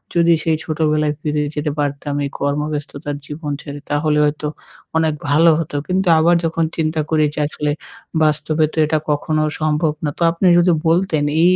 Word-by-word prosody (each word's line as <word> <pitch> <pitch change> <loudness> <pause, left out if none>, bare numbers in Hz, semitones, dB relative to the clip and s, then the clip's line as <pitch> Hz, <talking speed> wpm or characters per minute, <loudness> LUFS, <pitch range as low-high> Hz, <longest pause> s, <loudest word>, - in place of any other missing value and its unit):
যদি 170 0 +5
সেই 160 -1 +1
ছোটবেলায় 155 -1 0
ফিরে 150 -1 -1
যেতে 150 0 -1
পারতাম 145 0 -2
এই - - -3
কর্মব্যস্ততার 145 0 -2
জীবন 150 0 -5
ছেড়ে 145 -1 -8
তাহলে 150 +1 +1
হয়তো 150 0 -1 0.5
অনেক 160 -1 +2 0.2
ভালো 160 +4 +5
হতো। 165 -2 -4
কিন্তু 185 +1 0
আবার 170 +2 +4
যখন 165 0 0
চিন্তা 155 -1 0
করি 155 -1 +3
যে - - -3
আসলে 150 0 -2 0.5
বাস্তবে 155 +1 +1
তো - - -11
এটা 155 +1 +1
কখনো 155 +1 0 0.2
সম্ভব 155 0 +1
না। - - +1
তো - - +1
আপনি 170 +3 -2
যদি 175 +1 +4 0.2
বলতেন 165 -2 +2 0.2
এই 180 +1 +5
155 Hz, 170 wpm, -19 LUFS, 150-165 Hz, 0.5 s, যদি